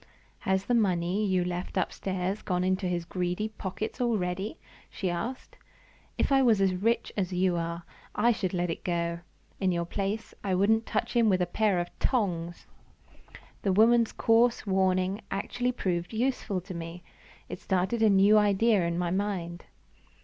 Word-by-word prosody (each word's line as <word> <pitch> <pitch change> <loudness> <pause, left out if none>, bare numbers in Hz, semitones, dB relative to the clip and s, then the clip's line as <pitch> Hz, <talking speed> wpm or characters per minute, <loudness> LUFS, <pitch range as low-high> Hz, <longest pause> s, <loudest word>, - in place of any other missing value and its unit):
"Has 190 +1 0
the 245 - 0
money 190 -3 +1
you 185 -3 +1
left 180 +2 -4
upstairs 190 +1 -2
gone 180 -1 -1
into 185 0 0
his 175 -1 -2
greedy 180 +4 -2
pockets 215 +2 -5
already?" 205 - -1 0.3
she 185 -3 -3
asked. 230 +10 -5 0.6
"If - - 0
I 270 0 +5
was 230 -5 +4
as 190 -1 +3
rich 225 +6 0
as 190 -3 -1
you 180 0 +1
are, 170 0 -3 0.3
I 235 +3 +4
should 195 -5 -2
let 175 -2 -1
it - - -6
go. 170 -1 -1 0.4
In 190 -2 +1
your 170 -1 -1
place, 200 +5 -3
I 190 -2 0
wouldn't 220 +4 +2
touch - - -2
him 230 -2 +4
with 185 -2 +3
a 180 - +2
pair 200 +2 +1
of 175 - -3
tongs!" 175 -9 -1 1.0
The 195 - +1
woman's 230 +3 +4
coarse 230 +1 +2
warning 190 0 +1
actually 245 +5 -1
proved 180 -5 -2
useful 225 -5 -1
to 185 +1 -8
me; 170 +1 -7 0.4
it - - -7
started 190 +4 0
a 220 - +5
new 200 +2 +6
idea 210 0 +3
in 170 0 -2
my 175 -1 -1
mind! 180 -3 -3
190 Hz, 165 wpm, -28 LUFS, 180-215 Hz, 1.0 s, new